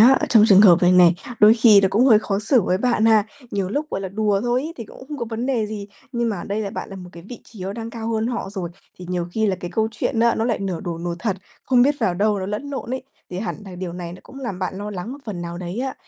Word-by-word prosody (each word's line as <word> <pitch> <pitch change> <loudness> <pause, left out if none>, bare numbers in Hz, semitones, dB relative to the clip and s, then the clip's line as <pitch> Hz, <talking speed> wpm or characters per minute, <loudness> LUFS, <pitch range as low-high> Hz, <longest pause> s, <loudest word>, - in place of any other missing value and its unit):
á, 245 +4 +8
ở - - 0
trong 220 -3 +6
trường 195 -1 +8
hợp 180 -5 +7
này 180 +1 +5
này, 180 -1 +6 0.3
đôi 210 +1 +8
khi 220 -3 +6
nó 190 - +2
cũng 225 +6 +3
hơi 220 -5 +7
khó 200 -2 -2
xử 220 +2 +2
với 185 0 0
bạn 235 -1 +1
ha. 220 -2 +5 0.3
Nhiều 195 -2 -2
lúc, 295 +8 -3
gọi - - -3
là, 195 - -4
đùa 205 0 0
thôi 245 +2 0
ấy 320 - -5
thì 230 - -7
cũng 240 - -13
không 300 - -5
có 235 - -2
vấn 230 +2 -3
đề 240 -5 0
gì, 210 -1 -6 0.3
nhưng 235 -1 0
mà 210 - -2
ở 170 - -6
đây 205 +2 -3
là 200 -2 -3
bạn - - -6
là 195 - -8
một 180 -1 -10
cái 170 - -11
vị 245 - -8
trí 210 -5 -11
nó 195 - -4
đang 230 +2 -6
cao 225 -1 -5
hơn 220 0 0
họ 235 -5 -3
rồi, 190 -4 -4 0.3
thì 180 - -9
nhiều 180 -1 -2
khi 220 +2 +1
là 190 -3 0
cái 175 -1 -7
câu 220 0 +1
chuyện 225 +1 -2
á, 235 0 +4
nó 220 - -1
lại 230 -2 0
nửa 190 -4 -3
đùa 170 -2 -5
nửa 175 0 -3
thật, 200 -2 -2 0.3
không 250 -2 +4
biết 285 +3 +3
vào 190 -6 +1
đâu 205 +2 +1
nó 190 - -4
lẫn 210 +8 -4
lộn 270 -3 -5
ấy, 260 0 -3 0.3
thì 180 - -5
hẳn 220 - -3
là 190 -2 -9
điều 180 -1 -5
này 175 -1 -6
nó 185 - -11
cũng 270 - -13
làm 235 -8 -5
bạn 185 0 -3
lo 205 +1 -5
lắng 205 +5 -6
một 285 - -9
phần 190 -6 -5
nào 170 0 -6
đấy 180 +3 -5
á. 265 0 -3
210 Hz, 320 wpm, -21 LUFS, 185-230 Hz, 0.3 s, á